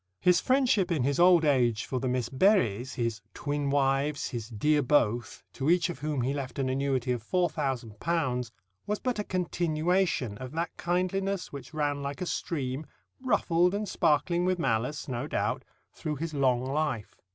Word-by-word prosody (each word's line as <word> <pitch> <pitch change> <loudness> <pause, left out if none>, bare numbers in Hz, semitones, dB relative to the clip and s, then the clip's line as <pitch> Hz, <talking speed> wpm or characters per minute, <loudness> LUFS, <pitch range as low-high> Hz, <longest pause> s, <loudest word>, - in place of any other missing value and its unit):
His 180 -1 +4
friendship 255 -8 +2
in 155 -7 +1
his 140 +3 0
old 175 -2 +6
age 120 -6 +2
for 130 - -2
the 130 - -2
Miss 125 -2 0
Berrys 130 - +2
his 115 -3 -2
"twin 145 -1 -2
wifes," 140 +1 +1
his 115 -3 -5
"dear 150 +7 +2
Both" 120 -4 +1
to 140 +2 -1
each 175 0 +3
of - - -9
whom 150 -2 -1
he 135 +3 0
left 140 -3 -5
an 135 -2 0
annuity 130 -1 0
of 120 -3 -2
£4,000, 135 - -1 0.4
was 210 - 0
but 250 -4 -2
a - - 0
continuation 170 - 0
of 130 +1 -7
that 165 +1 -3
kindliness 185 +2 -1
which 140 +2 -9
ran 145 -2 0
like 140 +3 -4
a 180 - -2
stream 140 -4 -3 0.3
(ruffled 180 -7 +2
and 210 0 -2
sparkling 170 0 +2
with 185 0 +1
malice, 125 -1 -1
no 130 +1 -3
doubt) - - -1 0.3
through 155 -1 -4
his 155 +2 -4
long 130 -3 +2
life. 135 -6 -2
145 Hz, 170 wpm, -29 LUFS, 130-175 Hz, 0.4 s, old